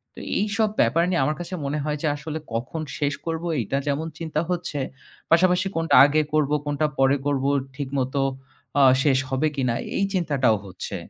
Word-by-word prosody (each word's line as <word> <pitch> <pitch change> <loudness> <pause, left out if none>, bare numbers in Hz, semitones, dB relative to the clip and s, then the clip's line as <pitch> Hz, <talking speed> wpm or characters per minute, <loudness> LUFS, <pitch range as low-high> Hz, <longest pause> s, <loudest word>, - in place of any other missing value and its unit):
তো - - -9 0.2
এইসব 210 +1 +1
ব্যাপার 170 +1 +3
নিয়ে 170 -7 +1
আমার 150 +3 0
কাছে 175 +2 -6
মনে 150 +2 -1
হয় 150 0 -2
যে 155 - 0
আসলে 155 +2 -5
কখন 125 +8 -3 0.2
শেষ 145 0 +1
করব 165 0 -3 0.2
এইটা 120 +5 -1
যেমন 150 +3 -1
চিন্তা 160 -1 -1
হচ্ছে, 170 -5 -2 0.5
পাশাপাশি 180 +2 +4
কোনটা 165 0 +2
আগে 155 +2 +3
করব 150 -2 +2
কোনটা 145 +1 0
পরে 135 +1 +4
করব 140 -2 0 0.3
ঠিকমতো 135 -1 -2 0.6
আ - - +6 0.2
শেষ 135 -3 +3
হবে 135 +4 +1
কিনা 125 -3 0 0.2
এই 195 - +2
চিন্তাটাও 140 - +2
হচ্ছে। 95 -1 -7
150 Hz, 175 wpm, -24 LUFS, 135-165 Hz, 0.6 s, আ